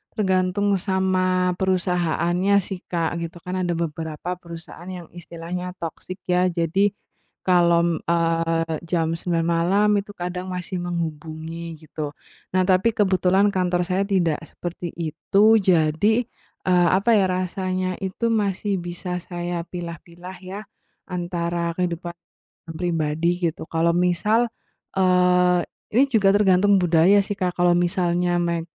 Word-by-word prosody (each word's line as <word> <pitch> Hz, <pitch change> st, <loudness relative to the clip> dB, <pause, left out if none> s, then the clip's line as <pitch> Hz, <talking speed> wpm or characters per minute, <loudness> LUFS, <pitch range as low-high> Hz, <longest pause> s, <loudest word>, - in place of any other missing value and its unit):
tergantung 190 Hz, -1 st, +1 dB
sama 185 Hz, -1 st, +1 dB
perusahaannya 180 Hz, 0 st, +1 dB
sih 190 Hz, 0 st, -6 dB
Kak 170 Hz, -1 st, -1 dB
gitu 170 Hz, +1 st, -6 dB
kan. 185 Hz, +1 st, -3 dB
Ada 175 Hz, -1 st, 0 dB
beberapa 160 Hz, 0 st, -4 dB
perusahaan 170 Hz, 0 st, -11 dB
yang 180 Hz, -3 st, -7 dB
istilahnya 175 Hz, +1 st, -6 dB
toxic 185 Hz, +2 st, -7 dB
ya. 180 Hz, 0 st, +2 dB
Jadi, 185 Hz, +4 st, +1 dB, 0.5 s
kalau, 170 Hz, -2 st, +3 dB
eee, 165 Hz, -1 st, +1 dB
jam 165 Hz, -2 st, 0 dB
9.00 165 Hz, -1 st, -1 dB
malam 175 Hz, +5 st, +2 dB
itu 205 Hz, +1 st, -7 dB
kadang 180 Hz, +1 st, -4 dB
masih 180 Hz, 0 st, -4 dB
menghubungi 165 Hz, -1 st, -5 dB
gitu. 155 Hz, -1 st, -6 dB, 0.4 s
Nah, 185 Hz, -, +4 dB
tapi 190 Hz, +4 st, +3 dB
kebetulan 190 Hz, 0 st, +3 dB
kantor 180 Hz, -2 st, +1 dB
saya 190 Hz, +1 st, +1 dB
tidak 175 Hz, -6 st, +1 dB
seperti 175 Hz, 0 st, -6 dB
itu. 170 Hz, +5 st, 0 dB, 0.2 s
Jadi, 185 Hz, +5 st, +2 dB, 0.4 s
eee, 180 Hz, -1 st, +4 dB
apa 220 Hz, +5 st, +2 dB
ya, 195 Hz, -3 st, +4 dB
rasanya 185 Hz, 0 st, -2 dB
itu 195 Hz, +4 st, -2 dB
masih 200 Hz, -2 st, 0 dB
bisa 175 Hz, +1 st, -5 dB
saya 175 Hz, -1 st, -4 dB
pilah-pilah 175 Hz, +1 st, -8 dB
ya, 190 Hz, +2 st, -6 dB, 0.5 s
antara 175 Hz, -1 st, -2 dB
kehidupan 175 Hz, -1 st, -3 dB, 0.6 s
pribadi 170 Hz, +1 st, 0 dB
gitu. 155 Hz, -, -10 dB
Kalau 165 Hz, +1 st, +1 dB
misal, 180 Hz, +7 st, +2 dB, 0.5 s
eee, 180 Hz, -1 st, +3 dB, 0.2 s
ini 245 Hz, +5 st, +5 dB
juga 210 Hz, -7 st, +3 dB
tergantung 200 Hz, 0 st, +4 dB
budaya 175 Hz, +3 st, +5 dB
sih, 200 Hz, 0 st, -2 dB
Kak. 180 Hz, -2 st, -2 dB
Kalau 175 Hz, 0 st, +4 dB
misalnya, 175 Hz, -1 st, +1 dB
me 170 Hz, -1 st, -1 dB
180 Hz, 125 wpm, -23 LUFS, 170-185 Hz, 0.6 s, ini